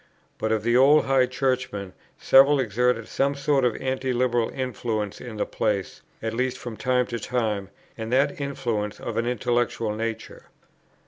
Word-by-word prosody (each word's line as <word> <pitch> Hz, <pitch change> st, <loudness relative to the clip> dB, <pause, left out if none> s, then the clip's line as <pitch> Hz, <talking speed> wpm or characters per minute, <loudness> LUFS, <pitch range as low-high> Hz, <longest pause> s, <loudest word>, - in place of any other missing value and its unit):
But 110 Hz, -, -1 dB
of 110 Hz, -1 st, 0 dB
the 120 Hz, +1 st, +2 dB
old 140 Hz, +4 st, +6 dB
High 135 Hz, -1 st, +3 dB
Churchmen 125 Hz, -7 st, -2 dB, 0.2 s
several 140 Hz, +2 st, +6 dB
exerted 125 Hz, 0 st, +1 dB
some 140 Hz, +1 st, 0 dB
sort 140 Hz, -1 st, +1 dB
of 120 Hz, -3 st, +2 dB
Anti 130 Hz, 0 st, -2 dB
liberal 120 Hz, -2 st, +1 dB
influence 115 Hz, -5 st, -3 dB
in 120 Hz, -3 st, -8 dB
the -, -, 0 dB
place, 100 Hz, -3 st, -2 dB, 0.2 s
at 110 Hz, 0 st, -2 dB
least 125 Hz, +2 st, -1 dB
from 120 Hz, -2 st, -7 dB
time 125 Hz, +1 st, +1 dB
to 120 Hz, -1 st, -5 dB
time, 110 Hz, -6 st, -2 dB, 0.3 s
and 110 Hz, +1 st, -4 dB
that 140 Hz, +3 st, +2 dB
influence 115 Hz, -7 st, -3 dB
of 115 Hz, -, -5 dB
an 115 Hz, +1 st, 0 dB
intellectual 120 Hz, -2 st, 0 dB
nature. 115 Hz, +1 st, -5 dB
120 Hz, 165 wpm, -25 LUFS, 110-130 Hz, 0.3 s, old